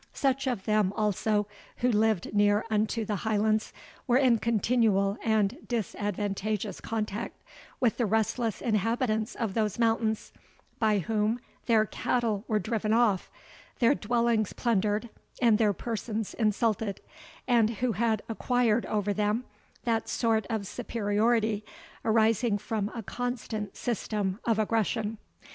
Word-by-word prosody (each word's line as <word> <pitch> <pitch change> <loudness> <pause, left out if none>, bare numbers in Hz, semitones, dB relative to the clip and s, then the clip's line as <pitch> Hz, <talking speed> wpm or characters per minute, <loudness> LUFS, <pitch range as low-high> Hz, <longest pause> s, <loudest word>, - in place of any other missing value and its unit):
Such 270 0 +1
of 235 -7 -2
them, 210 -3 +2
also, 210 0 +1 0.3
who 250 +1 +2
lived 215 -4 +1
near 205 +1 +3
unto 215 +1 +1
the 210 -1 -1
Highlands, 215 +1 +1 0.4
were 245 0 +4
in 255 -4 +4
continual 220 -3 +2
and 220 -1 +2
disadvantageous 205 -1 -2
contact 215 0 -3 0.4
with 240 -4 +2
the 235 - +1
restless 220 +1 0
inhabitants 220 +1 0
of 225 -5 -2
those 215 -2 0
mountains, 225 -2 0 0.5
by 215 -2 +3
whom 215 +4 0 0.3
their 220 -2 +4
cattle 220 -2 -1
were 215 - +2
driven 215 0 -1
off, 225 -5 +2 0.5
their 240 +2 +4
dwellings 235 -3 +1
plundered, 215 -1 0 0.3
and 230 -3 +4
their 215 -2 +4
persons 220 0 -4
insulted, 215 -2 0 0.5
and 235 -3 +4
who 235 +2 -1
had 220 0 0
acquired 235 0 +1
over 205 -1 0
them 210 +3 0 0.4
that 230 -2 0
sort 225 -2 +1
of 220 -3 -2
superiority 220 0 0 0.4
arising 225 0 +3
from 210 0 -2
a 230 - -4
constant 225 -3 -4
system 210 -4 -2
of 230 -2 +2
aggression. 220 0 0
220 Hz, 125 wpm, -28 LUFS, 210-230 Hz, 0.5 s, were